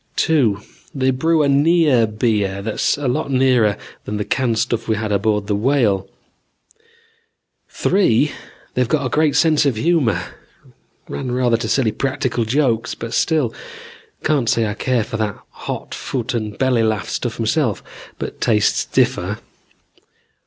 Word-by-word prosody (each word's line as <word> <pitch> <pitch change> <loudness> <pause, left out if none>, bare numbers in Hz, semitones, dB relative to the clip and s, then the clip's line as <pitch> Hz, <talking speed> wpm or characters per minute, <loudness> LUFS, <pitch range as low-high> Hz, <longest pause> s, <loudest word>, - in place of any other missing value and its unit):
"Two, 120 -11 +2 0.3
they 130 -1 +2
brew 160 +4 +2
a - - +2
near 145 -4 +4
beer 105 -3 -1
that's 110 +5 0
a 145 -2 -2
lot 140 +4 -1
nearer 130 -6 +3 0.3
than 105 - -3
the 105 - -2
canned 120 -4 0
stuff 115 0 -1
we 110 - +1
had 110 0 -3
aboard 105 0 +1
the 105 - -1
Whale. 105 -5 +1 1.6
"Three, 150 - +2 0.4
they've 125 -2 0
a 140 -4 +1
great 150 +2 +2
sense 160 -3 +4
of 140 -5 +1
humor. 135 - +1 0.9
Ran 70 - -4
rather 125 -1 +2
to 115 -1 -4
silly 125 -5 +2
practical 130 -2 -1
jokes, 125 -1 0
but 115 0 -6
still. 155 -8 +1 0.7
Can't 140 -7 +1
say 115 - +2
I 105 - -2
care 120 +1 0
for 110 - -5
that 105 -3 -2
hot - - -6
foot 130 -1 -3
and 110 -3 -3
belly 130 -3 +2
laugh 110 -2 0
stuff 120 -2 -3
myself, 115 0 0 0.3
but - - -6
tastes 105 -3 +2
differ. - - 0
120 Hz, 145 wpm, -19 LUFS, 110-140 Hz, 1.6 s, near